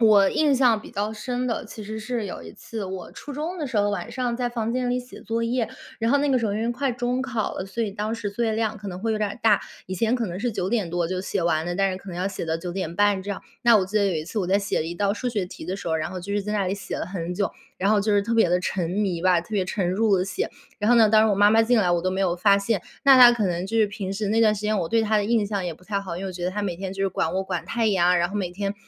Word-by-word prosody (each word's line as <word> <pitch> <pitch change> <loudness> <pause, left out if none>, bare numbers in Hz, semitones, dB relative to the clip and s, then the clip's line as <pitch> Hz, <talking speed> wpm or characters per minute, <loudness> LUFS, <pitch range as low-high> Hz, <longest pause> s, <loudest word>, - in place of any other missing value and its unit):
我 205 -3 +6
印 295 -4 +3
象 240 -5 +4
比 - - -12
较 210 +2 -2
深 250 +3 -3
的， 230 - -2
其 215 - -9
实 220 +2 -6
是 230 0 -3
有 180 - -6
一 80 - -10
次 225 -2 -7
我 185 -1 -7
初 290 - -10
中 325 +5 -3
的 300 - -2
时 240 - -4
候， 205 0 +3
晚 190 -4 -4
上 245 -2 -2
在 245 -1 -1
房 230 -1 -2
间 250 0 -1
里 250 - +1
写 250 0 -10
作 230 0 -2
业， 235 -1 0 0.3
然 225 +1 +1
后 285 - +5
那 290 0 +1
个 255 - +3
时 230 - 0
候 200 - -1
首 210 - -2
先 230 +2 0
快 265 +2 -1
中 245 +1 -1
考 245 -5 -2
了， 185 - -4
所 225 +4 -2
以 205 - -3
当 210 +2 -3
时 215 -3 -4
作 235 +4 -3
业 225 - +1
量 220 -1 -1
可 205 - -7
能 180 -1 -6
会 220 +3 -1
有 215 - -1
点 210 -1 0
儿 - - -8
大， 215 -3 +4 0.3
以 185 - -4
前 225 +6 +1
可 235 -2 -1
能 180 +1 -5
是 245 - 0
9 190 -4 -2
点 215 -7 0
多 175 -1 0
就 185 +1 -2
写 195 0 -2
完 160 -1 +1
了， 175 - -2
但 195 0 +2
是 - - -4
可 195 - -13
能 175 -1 -6
要 185 - 0
写 195 -3 -4
到 160 0 0
9 175 +1 -6
点 175 -3 -4
半 205 -2 +3
这 200 - -5
样， 200 - -5 0.2
那 235 -2 +6
我 190 - +2
记 210 +3 -3
得 200 - +3
有 185 - 0
一 155 0 -2
次 215 - -4
我 180 - -1
在 195 +2 +3
写 200 -4 -1
了 160 - -2
一 170 - -4
道 200 +2 +1
数 250 +4 -3
学 210 -5 -1
题 170 - -10
的 185 +2 -2
时 195 - -9
候， 160 - +1
然 160 +1 -2
后 185 - -5
就 195 +3 -6
是 205 0 0
在 210 +1 -3
那 200 -2 0
里 190 - 0
写 195 -2 -5
了 - - -3
很 180 -2 -4
久， 200 +1 -1 0.2
然 195 - 0
后 215 - +4
就 210 +1 +1
是 205 - +3
特 230 +3 -1
别 225 -5 +4
地 180 +1 +3
沉 180 -2 -2
迷 185 -4 -1
吧， 180 -2 +4
特 - - -20
别 200 -4 +1
沉 180 -1 -1
入 200 +2 +2
地 185 - +1
写。 400 - -3 0.3
然 210 +3 +1
后 240 - +6
呢， 220 -2 +6
当 215 0 +6
时 220 - +4
我 - - +3
妈 205 +1 +6
妈 225 +1 +5
进 240 +1 +3
来 190 -4 +2
我 175 -1 +1
都 185 - 0
没 190 +1 -2
有 175 -2 +1
发 200 +2 +4
现， 200 -1 0 0.2
那 275 -1 +8
她 245 -1 +10
可 225 -5 +1
能 175 +1 -2
就 225 +3 -2
是 215 - +5
平 200 -2 -5
时 205 +1 -2
那 225 +1 +3
段 215 -2 +5
时 210 - -6
间 210 0 +1
我 165 - -2
对 225 +3 +2
她 215 0 +2
的 205 - 0
印 220 -2 +2
象 200 -3 -2
也 175 - -2
不 180 - -21
太 200 +1 -2
好， 190 -4 -6
因 190 - -5
为 - - -3
我 - - -6
觉 175 -1 -5
得 180 - 0
她 205 +3 -3
每 185 -4 -2
天 190 +1 -5
就 195 - -3
是 195 - +2
管 165 -2 -1
我 190 - 0
管 - - -3
太 230 -1 0
严 190 -5 +3
啊， 180 +1 +5
然 175 0 +2
后 - - -8
每 185 -4 -2
天， 200 +2 -3
205 Hz, 375 characters per minute, -24 LUFS, 185-225 Hz, 0.3 s, 她